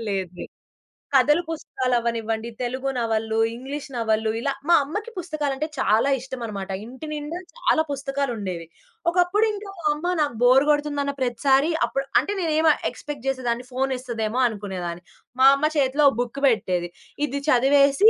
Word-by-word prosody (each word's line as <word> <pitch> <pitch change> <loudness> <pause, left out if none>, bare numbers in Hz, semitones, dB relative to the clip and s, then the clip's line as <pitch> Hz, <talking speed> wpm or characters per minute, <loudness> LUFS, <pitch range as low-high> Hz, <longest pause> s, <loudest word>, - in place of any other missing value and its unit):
లేదు 190 -3 -2
లేదు. - - -7 0.6
కథలు 295 +5 +5
పుస్తకాలు 260 -5 -2
అవ్వనివ్వండి 230 -1 -2
తెలుగు 260 +2 -2
నవళ్ళు, 225 -1 0 0.2
ఇంగ్లీష్ 275 +5 -6
నవళ్ళు, 220 -1 +1
ఇలా 275 +4 0 0.2
మా 345 - +7
అమ్మకి 415 +11 -5
పుస్తకాలంటే 305 -4 -2
చాలా 225 +1 +3
ఇష్టమాన్నమాట. 230 -7 -6 0.2
ఇంటి 260 +6 -9
నిండా 300 +3 -4 0.2
చాలా 320 -10 +2
పుస్తకాలుండేవి. 250 -11 -3 0.5
ఒకప్పుడు 360 +5 +3
ఇంకా 410 -1 -7
మా 310 - -1
అమ్మ 350 +4 -2
నాకు 285 -6 0
బోర్ 260 +3 +6
గోడుతుందన్న 290 -1 +1
ప్రతిసారి 270 +5 +2 0.2
అప్పుడు 275 - -2 0.2
అంటే 405 - -4
నేనేమి 315 -1 +3 0.2
ఎక్స్‌పెక్ట్ 290 -4 -8
చేసేదాన్ని. 250 -2 -1
ఫోన్ 265 +1 0
ఇస్తాదేమో 235 -1 -2
అనుకునేదాన్ని. 190 -5 -5 0.4
మా 265 - +9
అమ్మ 280 - 0
చేతిలో 280 +1 +3
ఒక 270 - -5
బుక్ 245 +3 -4
పెట్టేది. 180 -7 +1 0.4
ఇది 280 0 -3
చదివేసి 280 - +5
265 Hz, 145 wpm, -24 LUFS, 230-295 Hz, 0.6 s, మా